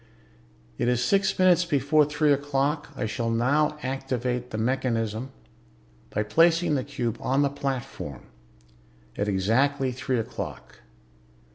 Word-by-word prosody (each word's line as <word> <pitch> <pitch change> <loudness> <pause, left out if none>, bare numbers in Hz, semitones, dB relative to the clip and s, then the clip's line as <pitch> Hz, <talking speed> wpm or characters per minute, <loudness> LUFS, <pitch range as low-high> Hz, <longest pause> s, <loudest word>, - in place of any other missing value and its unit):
"It - - +1
is 125 0 +2
six 195 +5 +2
minutes 185 -1 +5
before 150 -1 +3
three 150 0 +2
o'clock. 145 +1 -1
I - - -2
shall 115 +2 -2
now 145 +7 +2
activate 125 -2 -2
the 110 - -5
mechanism 115 -1 -1 0.8
by 105 - -1
placing 165 +7 +3
the 135 -3 0
cube 125 -5 -3
on 135 +2 +2
the 140 - +1
platform 135 - -5 0.9
at 100 - -1
exactly 130 +8 +1
three 130 0 -2
o'clock. 115 - -6
135 Hz, 125 wpm, -26 LUFS, 120-145 Hz, 0.9 s, minutes